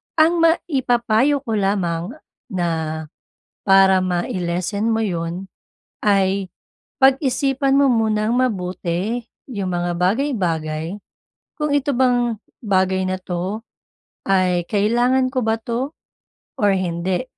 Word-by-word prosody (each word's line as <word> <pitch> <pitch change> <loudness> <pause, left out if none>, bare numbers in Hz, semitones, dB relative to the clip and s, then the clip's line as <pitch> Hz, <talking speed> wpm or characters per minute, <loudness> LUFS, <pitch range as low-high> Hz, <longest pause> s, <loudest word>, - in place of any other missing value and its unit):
Ang 330 +2 +4
maipapayo 270 -5 +2
ko 230 - -5
lamang 195 - -1 0.3
na 160 -4 -2 0.6
para 195 -1 +5
mai-lessen 180 +3 -1
mo 225 - +1
'yon, 175 -3 -3 0.6
ay 195 -2 +2 0.5
pag-isipan 270 0 +3
mo 280 - +5
munang 220 -1 +1
mabuti 190 -1 -1 0.2
yung 200 -7 -3
mga 175 0 -1
bagay-bagay 180 - -1 0.6
kung, 300 -1 0
"Ito 285 0 +1
bang 245 -2 +2 0.3
bagay 190 -2 +1
na 185 0 -1
'to 185 +5 -3 0.6
ay 185 -3 +2
kailangan 240 +5 +2
ko 255 - +1
ba 220 - +3
to 250 +7 -3 0.6
or 205 -1 +4
hindi?" 180 +2 -1
200 Hz, 105 wpm, -20 LUFS, 180-245 Hz, 0.6 s, para